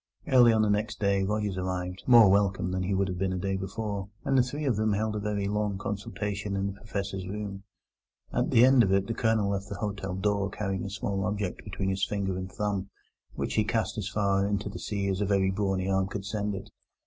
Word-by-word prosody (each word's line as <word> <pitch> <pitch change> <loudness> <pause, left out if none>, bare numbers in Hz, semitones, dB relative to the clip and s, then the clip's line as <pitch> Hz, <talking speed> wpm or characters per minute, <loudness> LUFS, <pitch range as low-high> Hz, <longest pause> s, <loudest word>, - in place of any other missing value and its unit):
Early 120 -3 +7
on 110 -1 +3
the 105 - +2
next 105 +2 -1
day 100 -1 +2
Rogers 105 -1 -1
arrived, 90 0 -3
more 120 -4 +9
welcome 95 -2 +2
than 95 0 -1
he 95 +2 0
would 95 0 +1
have 90 -2 -4
been 95 -1 0
a - - -2
day 95 +1 -1
before, 100 +1 -4 0.2
and 135 - +2
the 130 - +6
three 145 +5 -3
of 130 -5 +2
them 110 0 +1
held 105 +1 -1
a - - -1
very 100 -1 -1
long 105 -1 -1
consultation 105 0 -3
in 95 0 0
the 100 - -2
Professor's 100 -2 -4
room. 100 -1 -5 0.7
At - - +1
the 115 +2 +6
end 130 -1 +6
of 100 -4 +2
it 95 0 +3
the 115 - -2
Colonel 110 -3 +1
left 100 0 -3
the 100 - -4
hotel 100 -1 -3
door 100 +1 0
carrying 95 -3 -3
a - - -4
small 100 0 -2
object 105 -3 -2
between 95 -1 -3
his 95 0 -1
finger 100 -2 -1
and 95 0 -5
thumb, 100 -2 -2 0.5
which - - -2
he - - +3
cast - - -1
as - - -3
far 100 -1 +1
into 100 0 -1
the 100 - -7
sea 100 -2 -2
as 95 +1 -1
a - - +2
very 95 -1 +2
brawny 95 -1 -1
arm 95 0 +1
could 100 -1 -5
send 105 -1 -2
it. 95 - -8
100 Hz, 235 wpm, -28 LUFS, 95-105 Hz, 0.7 s, more